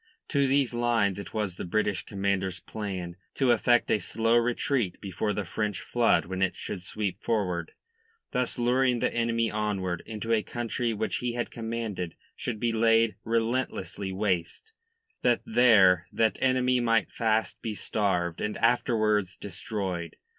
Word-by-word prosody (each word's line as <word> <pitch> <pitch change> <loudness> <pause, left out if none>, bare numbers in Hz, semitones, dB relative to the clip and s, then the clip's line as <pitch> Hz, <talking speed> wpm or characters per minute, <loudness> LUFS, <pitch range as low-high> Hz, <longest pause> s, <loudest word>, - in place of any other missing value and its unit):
To 140 -2 +2
these 135 -2 +2
lines 115 -5 +1
it 100 - -7
was 105 -5 -2
the - - -4
British 100 -1 -1
commander's 95 -2 -1
plan 90 -3 -5 0.2
to 130 -3 +3
effect 120 +1 +3
a 110 - +3
slow 115 +4 +1
retreat 120 -2 +1
before 100 +2 -2
the 105 0 -2
French 105 +2 -2
flood 120 -1 +2
when 95 +1 -4
it 95 -1 +1
should 95 - -5
sweep 100 0 -4
forward, 90 -7 -1 0.6
thus 125 -1 0
luring 125 +1 +2
the - - 0
enemy 115 -1 +1
onward 100 -5 -2
into 115 +1 -2
a 110 - +3
country 120 +1 -2
which 110 0 -1
he 125 -1 -2
had 120 0 -3
commanded 110 -7 -4 0.2
should 115 -4 -4
be 120 0 +1
laid 115 0 +3
relentlessly 115 -3 -1
waste, 95 - -2 0.5
that 120 -2 +2
there 100 -7 +5
that 110 -1 +2
enemy 130 -1 +3
might 115 -2 +2
fast 110 -1 0
be 110 -3 -3
starved 90 -4 -1
and 105 0 -2
afterwards 110 -5 +2
destroyed. 95 -3 -4
110 Hz, 150 wpm, -28 LUFS, 95-120 Hz, 0.6 s, there